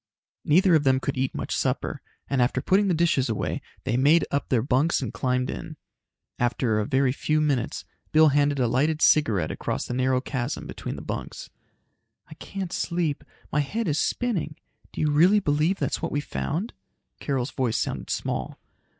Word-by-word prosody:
Neither 180 +4 +4
of 155 -3 +4
them 130 -1 +3
could 135 - -3
eat 130 0 -1
much - - -3
supper - - -1 0.3
and 135 -2 +1
after 125 +1 +2
putting 195 +8 +2
the 180 - +2
dishes 155 -6 +2
away, 110 - -2 0.2
they 125 -2 0
made 150 +6 +4
up 140 - -1
their 120 -4 +2
bunks 140 +5 +2
and 125 -4 -4
climbed 125 +1 0
in. - - -7 0.6
After 120 -2 +1
a 105 - -1
very 135 -1 +2
few 155 +3 0
minutes, 145 -6 -1 0.3
Bill 155 0 +6
handed 145 0 +2
a 125 -3 +2
lighted 150 +7 +1
cigarette 110 - +3
across - - -3
the - - -5
narrow 130 0 +2
chasm 130 0 -4
between - - -6
the - - -8
bunks. - - -6 0.8
"I 155 - -11
can't 190 +3 -6
sleep. 170 -4 -1 0.3
My 150 - +1
head 215 +11 -1
is 150 -1 +1
spinning. 200 -11 -1 0.4
Do - - -5
you 150 -1 +2
really 180 +8 +5
believe 155 +2 +1
that's - - -2
what - - -2
we've 145 0 -2
found?" 185 +10 -3 0.5
Carol's 135 -2 -2
voice 125 -4 0
sounded - - -3
small. - - -3
145 Hz, 180 wpm, -25 LUFS, 130-160 Hz, 0.8 s, Bill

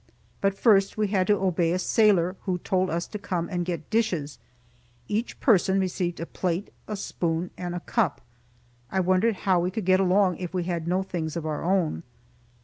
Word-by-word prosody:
But 195 0 +1
first 200 -4 +4
we 210 -2 +1
had 190 -2 +1
to 210 - +4
obey 175 -3 +1
a - - +1
sailor, 185 -2 +3
who 185 -2 0
told 185 0 0
us 170 +2 -1
to 210 - -7
come 175 -3 -2
and 175 -3 -1
get 170 -2 -4
dishes. 180 - 0 0.7
Each 220 +3 -2
person 195 -4 +3
received 180 -2 -2
a 165 - -3
plate, 180 +2 -3
a 215 - -3
spoon 170 -3 -2
and 175 -1 -5
a 175 - -4
cup. 200 - 0 0.7
I 190 - 0
wondered 185 +4 +2
how 185 -3 +4
we 175 +1 0
could 195 +1 -4
get 185 0 +4
along 190 -1 +3
if 180 0 -6
we 180 - 0
had 175 +1 -2
had 160 - -8
no 185 +2 +1
things 160 -5 -4
of 165 - -4
our 155 -1 -3
own. 175 - +1
185 Hz, 200 wpm, -26 LUFS, 175-195 Hz, 0.7 s, first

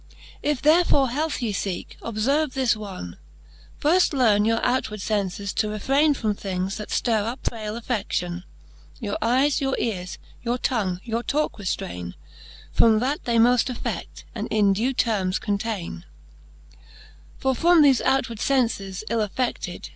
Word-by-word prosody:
If 295 -3 -1
therefore 305 -4 +4
health 295 0 -1
ye 220 -3 -1
feeke, 195 -2 -4
obferve 260 +6 0
this 260 -4 +2
one: 190 - -8 0.6
Firft 340 +3 +3
learne 215 -6 +4
your 225 +1 +2
outward 245 -4 0
fences 200 -1 -2
to 215 - 0
refraine 275 +8 +2
From 215 -5 0
things, 190 -1 -3
that 210 - -7
ftirre 225 -4 +1
up 245 +3 -5
frail 220 -1 -4
affeAion; 190 -7 -2 0.6
Your 210 -5 -3
eies, 265 +5 +2
your 270 -1 0
eares, 185 -6 -3 0.2
your 240 +1 -1
tongue, 195 -8 -1
your 230 0 -2
talke 295 +2 -1
reftaine 90 - -4 0.6
From 225 -1 +5
that 265 +6 -1
they 235 -1 +1
moft 245 +2 +4
affed, 245 - -5
and - - -4
in 205 -2 +3
due 230 +7 0
termes 200 -7 +1
containe. 200 - -3
VIII. 75 -1 -23 0.5
For 265 0 +1
from 335 +4 +5
thofe 275 -4 +5
outward 260 -4 0
fences 225 -8 0
ill 230 -1 0
affeded. 235 +4 -3
225 Hz, 145 wpm, -24 LUFS, 195-260 Hz, 0.6 s, From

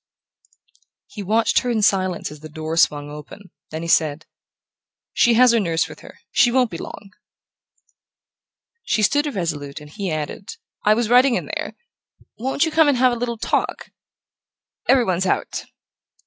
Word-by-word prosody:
He 210 - -9
watched 220 +4 +2
her 250 - -3
in 220 -3 0
silence 185 -5 +1
as 150 - -11
the 155 +1 -10
door 155 +1 -5
swung 145 -3 +2
open; 150 +6 -11 0.2
then 160 +1 -5
he - - -4
said: 160 -1 +1 0.9
"She 240 -2 +4
has 250 +1 +6
her 235 - +3
nurse 165 -5 0
with - - -12
her. - - -15
She 240 - +4
won't 250 -2 +2
be 165 - -6
long." 200 -1 -9 1.7
She 215 - 0
stood 290 +7 +2
irresolute, 160 - -4
and 150 0 -13
he 200 +1 -4
added: 155 +4 -5 0.3
"I 210 +1 +4
was 235 0 0
writing 250 +2 +5
in - - -2
there - - -5 0.6
won't 265 +6 +1
you 320 - -2
come 315 0 +4
and 285 -3 +3
have 255 0 +4
a - - -1
little 235 0 -3
talk? - - -2 1.0
Every 260 -3 +5
one's 185 -1 0
out." - - -2
205 Hz, 165 wpm, -21 LUFS, 160-240 Hz, 1.7 s, has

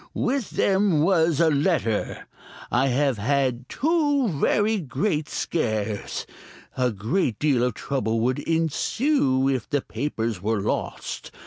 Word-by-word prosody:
With 260 -3 -1
them 200 +1 +2
there 160 -5 +2
was 165 -3 +3
a 165 -2 +4
letter. 140 - 0 0.5
I 125 +3 +3
have 135 -2 +1
had 130 +1 0
two 290 -5 +1
very 205 +7 +1
great 155 - -2
scares. 110 -9 -2 0.5
A 125 -1 +1
great 115 - -1
deal 140 -5 +2
of 125 - 0
trouble 115 -5 -1
would 125 +2 +1
ensue 165 - +1
if 130 -4 -1
the 145 -2 +1
papers 110 -3 -3
were 110 +2 0
lost. - - -3
140 Hz, 130 wpm, -24 LUFS, 120-175 Hz, 0.5 s, a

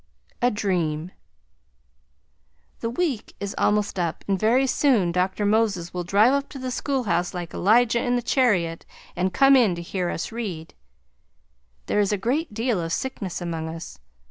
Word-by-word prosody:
A 245 - +4
DREAM 175 -6 -1 1.7
The 230 - -2
week 260 -3 -2
is 200 0 -4
almost 205 -2 +1
up 170 -2 -2
and 195 -1 +1
very 240 +6 +3
soon 250 -9 +2
Dr. 185 +3 0
Moses 205 -5 +1
will 180 -1 -3
drive 205 +8 +4
up 280 0 -1
to - - -9
the 255 -1 -4
school 270 0 -1
house 180 -4 -1
like 175 -2 -5
Elijah 235 +4 +3
in 245 0 +1
the 245 - -1
chariot 185 -11 +1 0.3
and 185 +1 0
come 270 +8 +5
in 225 -9 +4
to 170 - -6
hear 180 0 -2
us - - -4
read. 195 -9 -5 1.1
There - - 0
is 205 -1 +2
a 205 - +1
good 265 - 0
deal 225 -2 -1
of 165 0 -4
sickness 195 -6 -3
among 165 -2 -4
us. 165 - -8
205 Hz, 170 wpm, -24 LUFS, 175-245 Hz, 1.7 s, come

